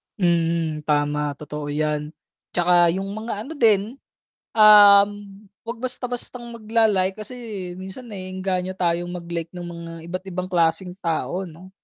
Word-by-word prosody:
Mhm, 165 -4 0
tama, 145 -1 0
totoo 150 0 -7
yan, 150 +1 -2 0.4
'tsaka 175 0 +5
yung 195 +1 -4
mga 215 0 -4
ano 315 - -8
din, 225 -1 +2 0.5
um, 205 -2 +8 0.5
wag 230 0 -6
basta-bastang 250 -1 -2
magla-like, 215 -4 +1
kasi, 215 -5 -6
minsan, 190 +6 -7
naeenganyo 185 -1 -3
tayong 175 -1 -1
mag-like 170 -2 -5
ng 175 - -6
mga 170 -1 -8 0.2
iba't 185 +1 -4
ibang 185 0 -4
klaseng 170 +1 +1
tao 170 +1 -2
'no. 175 +3 -13
185 Hz, 125 wpm, -23 LUFS, 170-210 Hz, 0.5 s, um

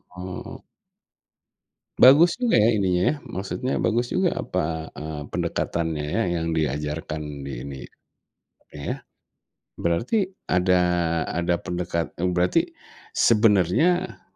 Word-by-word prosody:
heeh 90 0 -6
heeh. - - -10 1.4
Bagus 165 - +7
juga 240 - +3
ya, 110 +2 +4
ininya, 95 +7 +1
maksudnya 100 +7 -3
bagus 120 +2 0
juga 185 -2 +1
apa, 80 -2 -3
eee, 75 -1 -5
pendekatannya 80 -3 -2
ya, 115 - 0 0.2
yang 80 - -2
diajarkan 75 0 -2 0.2
di 65 -3 -6
ini 70 -1 -7 0.8
oke - - -17
ya, 70 - -3 0.9
berarti 130 - +1 0.2
ada 90 0 +3 0.5
ada 85 0 0
pendekat 85 -3 -3
eee, 90 +1 -1
berarti 90 0 +1 0.4
sebenarnya 115 - +3
90 Hz, 110 wpm, -24 LUFS, 80-115 Hz, 1.4 s, Bagus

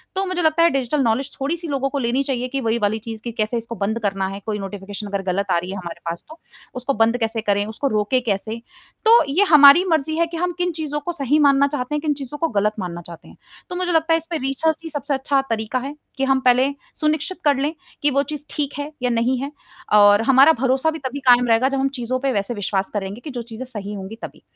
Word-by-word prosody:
तो 385 - 0
मुझे 370 -1 -2
लगता 320 +1 +3
है 340 - +6
डिजिटल 275 +2 -1
नौलेज 255 +5 0
थोड़ी-सी 330 +5 -2
लोगों 275 -1 -1
को 280 - -2
लेनी 245 +2 0
चाहिए 255 -2 -2
कि 270 0 -2
वही 230 0 0
वाली 210 +1 0
चीज़ 225 0 -8
की 235 - -4
कैसे 220 +1 -1
इसको 230 +1 -6
बंद 220 +2 -1
करना 195 -2 -1
है। 195 +1 -6
कोई 210 -2 -2
नोटिफ़िकेशन 200 +1 -7
अगर 200 -1 -2
गलत 200 +1 -1
आ - - +3
रही 180 +2 -4
है 195 - -5
हमारे 170 -2 -7
पास 170 - -6
तो, 315 - -12 0.4
उसको 255 +2 -2
बंद 230 +2 +4
कैसे 225 0 -1
करें, 205 -1 +1
उसको 220 +6 -3
रोकें 230 +5 +1
कैसे? 220 +2 -2 0.4
तो 460 -2 +7
ये 360 +9 +3
हमारी 290 +4 +9
मर्ज़ी 315 0 +1
है 335 0 +2
कि 335 0 -6
हम 355 +1 0
किन 355 0 0
चीज़ों 295 -1 -2
को 345 +4 -4
सही 285 -1 +1
मानना 275 0 +4
चाहते 285 0 -3
हैं, 295 - -1
किन 300 -2 +1
चीज़ों 280 +1 -7
को 330 - 0
गलत 210 +1 +1
मानना 175 -2 -5
चाहते 170 -1 -12
हैं। - - -16 0.3
तो 360 - -5
मुझे 360 0 -1
लगता 325 0 +2
है - - +5
इसमें 330 0 -5
रिसर्च 315 +4 0
ही 325 - -6
सबसे 290 -1 -3
अच्छा 270 +1 +1
तरीका 225 +3 -1
है 280 +3 -6 0.2
कि 270 - -1
हम 270 0 +3
पहले 255 +2 +4 0.3
सुनिश्चित 310 +4 -1
कर 285 -1 +5
लें 290 +4 -1 0.3
कि 290 - +3
वो 280 +1 +2
चीज़ 295 -1 -6
ठीक 285 -2 -3
है 290 +2 -4
या 250 - +1
नहीं 240 +2 +1
है 280 +1 -4 0.5
और 205 +1 +6
हमारा 270 +4 +7
भरोसा 265 +4 +2
भी 320 - -6
तभी 270 +1 -5
कायम 245 0 +6
रहेगा 230 +4 +3
जब 275 -1 -1
हम 275 - +1
चीज़ों 255 +2 -2
पे 270 0 0
वैसे 200 +4 -1
विश्वास 200 -2 -2
करेंगे 205 +3 -4
कि 305 - -6
जो 245 -2 -4
चीज़ें 235 +2 -8
सही 210 -4 -7
होंगी 195 +2 -7
तभी। - - -9
260 Hz, 255 wpm, -21 LUFS, 220-295 Hz, 0.5 s, हमारी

